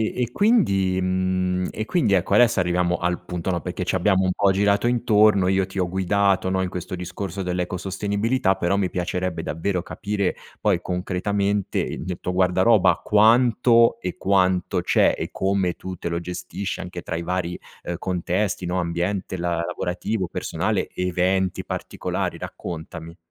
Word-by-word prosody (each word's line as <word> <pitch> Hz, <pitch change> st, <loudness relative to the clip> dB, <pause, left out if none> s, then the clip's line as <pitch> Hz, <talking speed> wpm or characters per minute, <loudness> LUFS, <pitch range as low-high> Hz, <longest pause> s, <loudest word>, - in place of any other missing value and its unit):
e 125 Hz, -2 st, -1 dB
quindi 100 Hz, -, +2 dB
mhmm, 95 Hz, 0 st, 0 dB
e 110 Hz, -, -4 dB
quindi, 115 Hz, -, +1 dB
ecco, 90 Hz, -2 st, +2 dB
adesso 120 Hz, -4 st, +5 dB
arriviamo 90 Hz, 0 st, +1 dB
al 90 Hz, +1 st, -2 dB
punto, 90 Hz, 0 st, -4 dB
no, 90 Hz, -2 st, 0 dB
perché 90 Hz, +2 st, -4 dB
ci 90 Hz, -, -1 dB
abbiamo 95 Hz, +1 st, +3 dB
un 95 Hz, -, +2 dB
po' 100 Hz, 0 st, +3 dB
girato 100 Hz, +2 st, +2 dB
intorno. 110 Hz, -5 st, +4 dB
Io 95 Hz, 0 st, +2 dB
ti 95 Hz, +1 st, -6 dB
ho 90 Hz, -1 st, 0 dB
guidato, 95 Hz, +1 st, +1 dB
no, 95 Hz, 0 st, +1 dB
in 95 Hz, -, -1 dB
questo 90 Hz, 0 st, -6 dB
discorso 95 Hz, +1 st, -5 dB
dell'ecosostenibilità. 95 Hz, +5 st, -1 dB
Però 95 Hz, +1 st, 0 dB
mi 95 Hz, -3 st, 0 dB
piacerebbe 90 Hz, 0 st, -2 dB
davvero 90 Hz, +4 st, -2 dB
capire, 100 Hz, +1 st, -2 dB, 0.3 s
poi, 100 Hz, -5 st, +2 dB
concretamente, 100 Hz, +3 st, -1 dB
i -, -, -2 dB
il 90 Hz, -1 st, -4 dB
tuo 90 Hz, -, -2 dB
guardaroba. 95 Hz, +3 st, +3 dB
Quanto 115 Hz, +2 st, +4 dB
e 90 Hz, -5 st, -4 dB
quanto 95 Hz, -2 st, +1 dB
c'è, -, -, +3 dB
e -, -, -4 dB
come 95 Hz, -2 st, 0 dB
tu 95 Hz, +2 st, -7 dB
te -, -, -6 dB
lo 85 Hz, 0 st, -1 dB
gestisci, 90 Hz, +2 st, -5 dB
anche 90 Hz, -1 st, -7 dB
tra 85 Hz, -, -5 dB
i 85 Hz, -, -3 dB
vari, 90 Hz, 0 st, -2 dB, 0.3 s
uhm, 85 Hz, -, -3 dB
contesti, 90 Hz, +2 st, -1 dB
no, 90 Hz, +1 st, 0 dB
ambiente 90 Hz, +3 st, -2 dB
la 85 Hz, 0 st, -1 dB
lavorativo, 90 Hz, +3 st, -2 dB
personale, -, -, -2 dB
eventi 90 Hz, +1 st, 0 dB
particolari. -, -, -3 dB
Raccontami. 85 Hz, 0 st, -7 dB
95 Hz, 160 wpm, -23 LUFS, 90-100 Hz, 0.3 s, adesso